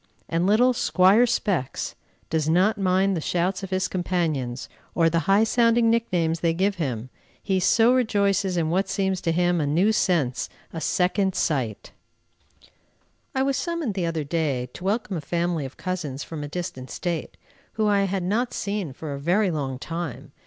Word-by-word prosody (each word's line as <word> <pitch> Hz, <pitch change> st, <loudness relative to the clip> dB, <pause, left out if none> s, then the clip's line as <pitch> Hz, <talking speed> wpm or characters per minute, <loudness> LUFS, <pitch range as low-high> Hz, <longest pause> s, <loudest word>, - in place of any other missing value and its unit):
and 170 Hz, +2 st, 0 dB
little 245 Hz, +5 st, +4 dB
"Squire 205 Hz, +1 st, +4 dB
Specs" 185 Hz, -, -1 dB, 0.4 s
does 155 Hz, -1 st, +1 dB
not 190 Hz, +6 st, +3 dB
mind 190 Hz, +1 st, +2 dB
the 165 Hz, -, -2 dB
shouts 180 Hz, +4 st, -1 dB
of 195 Hz, -, -6 dB
his 185 Hz, 0 st, 0 dB
companions 160 Hz, -10 st, -2 dB, 0.3 s
or 165 Hz, -1 st, +3 dB
the 170 Hz, +3 st, -1 dB
high 200 Hz, +3 st, +5 dB
sounding 230 Hz, 0 st, +3 dB
nicknames 175 Hz, -8 st, 0 dB
they 165 Hz, -1 st, +1 dB
give 195 Hz, +2 st, +1 dB
him, 130 Hz, -6 st, -3 dB, 0.3 s
he 190 Hz, -2 st, +1 dB
so 225 Hz, +6 st, +4 dB
rejoices 200 Hz, -6 st, +1 dB
in 160 Hz, -1 st, 0 dB
what 190 Hz, +2 st, +1 dB
seems 190 Hz, -2 st, 0 dB
to 165 Hz, -, 0 dB
him 175 Hz, 0 st, +2 dB
a 145 Hz, -, 0 dB
new 175 Hz, +9 st, +3 dB
sense, 165 Hz, -, +1 dB, 0.2 s
a 165 Hz, -, -5 dB
second 190 Hz, +3 st, +1 dB
sight. 125 Hz, -9 st, -1 dB, 1.4 s
I 265 Hz, -, +2 dB
was 275 Hz, 0 st, +1 dB
summoned, 335 Hz, -, -2 dB
the 185 Hz, -3 st, -1 dB
other 165 Hz, -2 st, -2 dB
day, 145 Hz, -5 st, -1 dB
to -, -, -10 dB
welcome 200 Hz, -1 st, -1 dB
a -, -, -4 dB
family 170 Hz, 0 st, -1 dB
of 130 Hz, -, -15 dB
cousins 160 Hz, -7 st, -4 dB
from 155 Hz, -3 st, -6 dB
a -, -, -4 dB
distant 145 Hz, -5 st, -5 dB
State, 170 Hz, -3 st, -4 dB, 0.4 s
whom 215 Hz, -1 st, +1 dB
I 200 Hz, -1 st, +3 dB
had 195 Hz, -1 st, -2 dB
not 230 Hz, +7 st, 0 dB
seen 200 Hz, -8 st, -3 dB
for 150 Hz, +1 st, -6 dB
a 140 Hz, -, -5 dB
very 180 Hz, +6 st, +2 dB
long 135 Hz, -5 st, -3 dB
time. 165 Hz, -1 st, -6 dB
180 Hz, 175 wpm, -24 LUFS, 160-200 Hz, 1.4 s, high